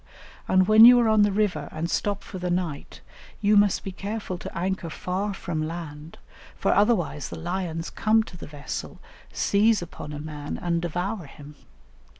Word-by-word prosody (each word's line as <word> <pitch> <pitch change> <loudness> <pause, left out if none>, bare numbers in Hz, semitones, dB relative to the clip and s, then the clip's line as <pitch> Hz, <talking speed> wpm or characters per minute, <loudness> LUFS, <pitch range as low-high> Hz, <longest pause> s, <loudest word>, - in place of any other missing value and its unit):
And 185 0 +4
when 215 +1 +8
you 245 +1 +10
are 235 - +3
on 220 -1 +4
the 205 0 +4
river 195 -7 0
and 160 +2 -3
stop 200 +3 -1
for 190 - -8
the 180 0 -2
night, 175 -5 -3 0.4
you 210 0 +3
must 205 -1 +4
be 195 - -5
careful 200 0 -5
to - - -8
anchor 185 -1 -2
far 185 +5 -3
from 160 -5 -3
land, 160 -2 -8 0.4
for - - +2
otherwise 200 -7 +1
the - - -7
lions 170 -1 -3
come 220 0 +2
to 195 - -12
the 175 - -9
vessel, 145 -1 -7 0.3
seize 215 +2 +3
upon 155 -3 -9
a 150 - -5
man, 150 -1 -6
and 170 -1 -1
devour 175 +1 -3
him. 145 +1 -12
180 Hz, 175 wpm, -25 LUFS, 165-205 Hz, 0.4 s, you